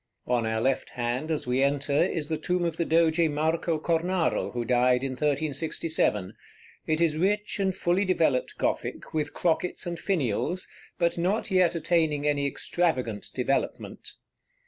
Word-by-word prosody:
On 120 -2 +1
our 110 0 0
left 130 +3 0
hand, 125 +5 -2
as 155 -2 -1
we 125 +1 +1
enter, 140 +1 +1
is 155 0 +1
the 160 -1 -2
tomb 180 +2 0
of 165 -1 -2
the 170 - 0
Doge 165 0 +3
Marco 160 +2 0
Cornaro, 170 +2 0
who 120 -1 -3
died 125 +1 +3
in 135 - -2
1367. 145 - 0 0.5
It 155 0 +1
is 165 -2 +2
rich 205 +5 0
and 190 -2 +1
fully 175 +3 +1
developed 165 -9 +1
Gothic, - - -2
with 150 -2 -2
crockets 175 +2 0
and 170 -1 -4
finials, 175 - -1 0.3
but 170 0 +1
not 195 +5 0
yet 180 -2 +3
attaining 160 -3 +1
any 145 -1 +1
extravagant 130 -8 -1
developement. 135 +2 -2
155 Hz, 150 wpm, -27 LUFS, 135-170 Hz, 0.5 s, Doge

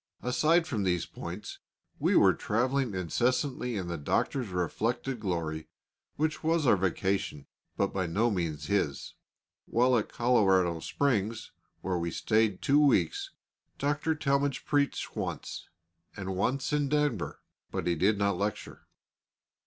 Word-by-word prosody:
Aside 155 +7 +3
from 120 -9 -2
these 90 -3 +1
points, 90 +5 -7 0.4
we - - +2
were - - +6
travelling 125 0 0
incessantly 125 - 0
in 95 -3 -3
the 85 -2 -4
Doctor's 125 - 0
reflected 110 +8 -2
glory, 80 -6 -3 0.5
which 155 +1 -1
was 160 -1 +2
our 120 - +6
vacation, 95 -5 -1 0.3
but 100 - 0
by 95 -2 -1
no 110 +8 +1
means 85 -6 -2
his. 80 -9 -1 0.5
While 125 +2 +3
at 110 - 0
Colorado 95 -8 +3
Springs, 115 - -1 0.3
where 90 -2 -1
we 85 0 -1
stayed 110 +2 +1
two 140 +2 +4
weeks, 390 - +2 0.5
Dr. 150 +3 0
Talmage 140 -2 0
preached 145 -1 0
once, - - -5 0.5
and 95 -1 -4
once 130 +9 0
in 145 -2 +1
Denver, 145 - -1 0.3
but - - -3
he 85 - +2
did 95 +6 +2
not 100 -2 +1
lecture. 105 0 -4
110 Hz, 135 wpm, -29 LUFS, 95-140 Hz, 0.5 s, were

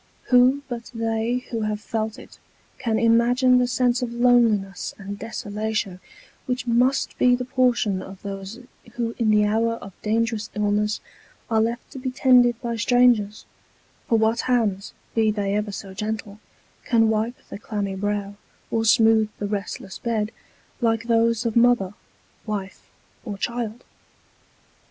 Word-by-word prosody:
Who, 255 +3 +5
but 240 -3 -6
they 230 +2 -1
who 230 -2 -2
have 215 -1 -2
felt 220 -1 -3
it, - - -14 0.4
can 225 -4 0
imagine 245 +3 +4
the 250 - +2
sense 250 0 +1
of 245 -2 -2
loneliness 235 -6 +2
and 200 0 -7
desolation 215 -3 -3 0.5
which 250 0 -2
must 250 +3 +2
be 250 0 +5
the 250 0 -4
portion 245 -6 +1
of 190 0 -10
those 195 +3 -6 0.3
who 235 -1 -2
in 225 -2 +2
the 210 -1 +4
hour 225 +2 +1
of 200 -4 -9
dangerous 225 0 -1
illness 210 0 0 0.5
are 220 -1 +3
left 235 +2 -2
to 270 - -8
be 260 0 -3
tended 250 -2 +4
by 235 -1 -2
strangers; 230 -3 +3 0.6
for 230 - +4
what 220 +1 +2
hands, 215 -6 0 0.2
be 220 -1 +3
they 205 -2 -1
ever 210 0 -1
so 195 -1 -7
gentle, 210 0 -5 0.4
can 225 -2 +3
wipe 220 +3 0
the - - -7
clammy 205 -3 -3
brow, 205 +1 -2 0.4
or 225 0 0
smooth 220 -1 +5
the 205 - -3
restless 200 -1 -5
bed, 220 -2 -1 0.5
like 225 -1 +1
those 230 0 +2
of 230 - -1
mother, 235 -5 +3 0.5
wife, 200 -3 -5 0.3
or 205 -4 -6
child 235 +1 -3
225 Hz, 145 wpm, -23 LUFS, 210-240 Hz, 0.6 s, Who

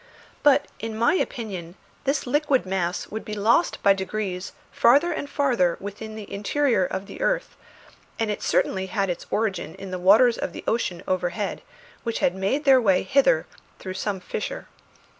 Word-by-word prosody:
But 290 0 +5
in 225 -1 -5
my 230 +1 +3
opinion 195 - -3 0.3
this 275 +1 0
liquid 280 -1 +1
mass 185 -2 -2
would 220 +1 -5
be 210 - -5
lost 225 +11 +2
by 200 - +7
degrees 190 -1 -4 0.2
farther 285 +9 +4
and 285 -3 -4
farther 240 - +1
within 210 +2 -7
the 215 -2 -8
interior 220 +1 +1
of 190 +2 -3
the 485 - -10
earth, - - 0 0.6
and 225 -2 0
it 205 - -4
certainly 190 0 +1
had 195 -1 0
its 175 - -6
origin 200 -7 -1
in 195 -1 -8
the 185 - -3
waters 220 +7 +5
of - - -3
the - - -8
ocean 205 -6 -1
overhead, 185 +3 -2 0.4
which 230 -2 -2
had 175 - +2
made 200 +11 -1
their 265 -2 +6
way 190 -5 +3
hither 280 - +3 0.3
through 185 - -6
some 190 +1 -3
fissure. - - -5
210 Hz, 170 wpm, -24 LUFS, 190-260 Hz, 0.6 s, by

